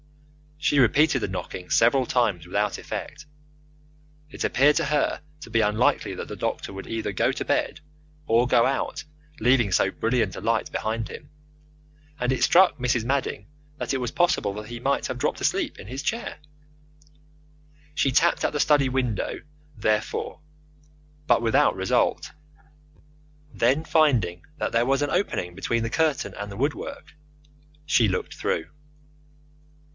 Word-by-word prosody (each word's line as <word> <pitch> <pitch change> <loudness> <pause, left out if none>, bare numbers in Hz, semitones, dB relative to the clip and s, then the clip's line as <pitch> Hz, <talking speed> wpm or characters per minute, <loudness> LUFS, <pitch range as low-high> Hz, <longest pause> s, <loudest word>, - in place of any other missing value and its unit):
She 150 -1 +1
repeated 135 +4 +4
the - - -1
knocking 95 -1 -6
several 125 +3 +4
times 105 -10 0
without 100 +4 -1
effect. - - -7 1.0
It - - -6
appeared 145 +3 +4
to 165 - +1
her 150 +1 0 0.2
to - - -9
be 115 0 +2
unlikely 105 +3 +1
that - - -6
the - - -6
doctor - - -3
would 95 0 -8
either 115 0 -3
go - - +1
to - - -4
bed - - -1 0.4
or 115 +2 +3
go 120 -1 +4
out 145 +3 -2 0.4
leaving 120 -3 +3
so 95 +2 +2
brilliant 115 -4 0
a - - -7
light 115 +1 0
behind 110 0 -2
him, 145 - -10 0.9
and 125 +1 0
it 130 - 0
struck 185 -1 +5
Mrs. 125 -3 0
Madding 135 +3 -2 0.3
that - - -3
it - - +1
was 125 -2 -3
possible 170 - +1
that 105 +1 -8
he 120 0 -6
might 140 +3 0
have 130 - -4
dropped 145 - -1
asleep - - 0
in - - -10
his 130 +4 -5
chair. 230 +1 -3 1.6
She 140 -2 +1
tapped 165 +6 +3
at - - 0
the 150 - -1
study 145 -2 +3
window, 125 -5 -2 0.4
therefore, 110 +7 -1 0.9
but - - +3
without 115 -1 +3
result. - - 0 1.2
Then, 130 +7 +2
finding 140 - +2
that - - -2
there 115 +1 +2
was 135 +2 +1
an 145 - -1
opening 90 - -1
between 115 +5 -1
the 115 - -3
curtain 155 -2 0
and 105 0 -6
the 100 - -8
woodwork, 155 - -3 0.7
she 120 -6 +3
looked 95 - -2
through. 80 - -2
125 Hz, 155 wpm, -25 LUFS, 110-145 Hz, 1.6 s, struck